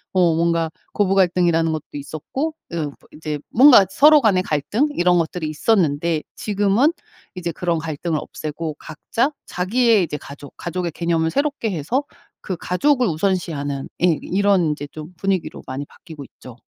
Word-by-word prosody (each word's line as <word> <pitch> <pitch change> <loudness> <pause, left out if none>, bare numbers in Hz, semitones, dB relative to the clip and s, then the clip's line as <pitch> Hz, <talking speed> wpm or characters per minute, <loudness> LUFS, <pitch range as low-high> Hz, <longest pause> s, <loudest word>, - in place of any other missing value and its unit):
어 175 -3 +4
뭔가 165 0 +1 0.2
고부 195 -2 +2
갈등이라는 175 -3 +3
것도 155 -1 -3
있었고 155 - -4 0.2
어 155 -3 -2 0.2
이제 155 -1 -4
뭔가 245 -6 +7
서로 300 +7 +6
간의 195 -6 +3
갈등 185 - 0
이런 180 0 +3
것들이 165 -1 -2
있었는데 160 -2 +1
지금은 210 +8 +2 0.4
이제 175 -3 -4
그런 170 0 -1
갈등을 155 0 -3
없애고 155 0 -5
각자 230 - -2 0.2
자기의 215 +3 +2
이제 155 -3 -3
가족, 140 0 -11
가족의 175 0 -3
개념을 165 0 0
새롭게 280 - -1
해서 190 - -1 0.4
그 185 - -4
가족을 250 - +1
우선시하는 160 -6 -2 0.2
예 170 -4 +3
이런 190 -4 +2
이제 145 -1 -7
좀 155 +3 -9
분위기로 195 -1 -2
많이 135 +2 -5
바뀌고 155 0 -12
있죠. 125 -2 -14
175 Hz, 335 characters per minute, -21 LUFS, 155-200 Hz, 0.4 s, 뭔가